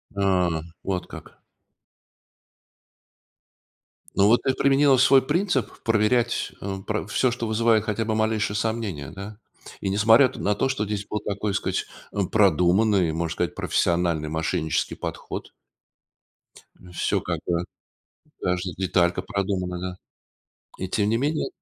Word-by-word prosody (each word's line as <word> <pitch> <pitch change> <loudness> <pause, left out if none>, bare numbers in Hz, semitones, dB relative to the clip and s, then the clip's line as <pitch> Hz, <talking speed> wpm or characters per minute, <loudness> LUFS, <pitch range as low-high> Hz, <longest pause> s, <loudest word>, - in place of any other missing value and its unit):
А. 90 -5 +1 0.2
Вот 90 -2 -2
как. - - -11 2.8
Ну 100 - +5
вот 115 +3 +5
ты 135 - +2
применила 140 0 +4
свой 130 +2 +6
принцип 145 - -1
проверять, 115 +2 +1
э, 100 0 -4
про 105 -2 -2
всё, 125 +4 +1
что 115 -1 -3
вызывает 110 0 +3
хотя 110 0 -2
бы 110 - -1
малейшие 110 -1 0
сомнение 105 - -2
да, 100 +2 -8 0.4
и 95 - -1
несмотря 110 +6 +5
т - - -10
на 105 0 +1
то, 135 - 0
что 120 -5 -1
здесь 100 -1 -3
был 105 - -2
такой 105 0 -3
сказать 100 - -1 0.5
продуманный, 95 -1 +3
можно 80 0 -2
сказать, - - -2
профессиональный 85 -3 0
мошеннический 80 0 -1
подход. - - -6 1.4
Всё - - 0
как - - -3
бы, 85 0 0 0.8
каждая 90 0 -1
деталька 90 -2 +1
продумана, 95 -4 -2
да, 90 0 -5 0.9
и - - -2
тем 105 +1 +1
не 115 - +2
менее. 150 +5 0
105 Hz, 130 wpm, -24 LUFS, 90-115 Hz, 2.8 s, свой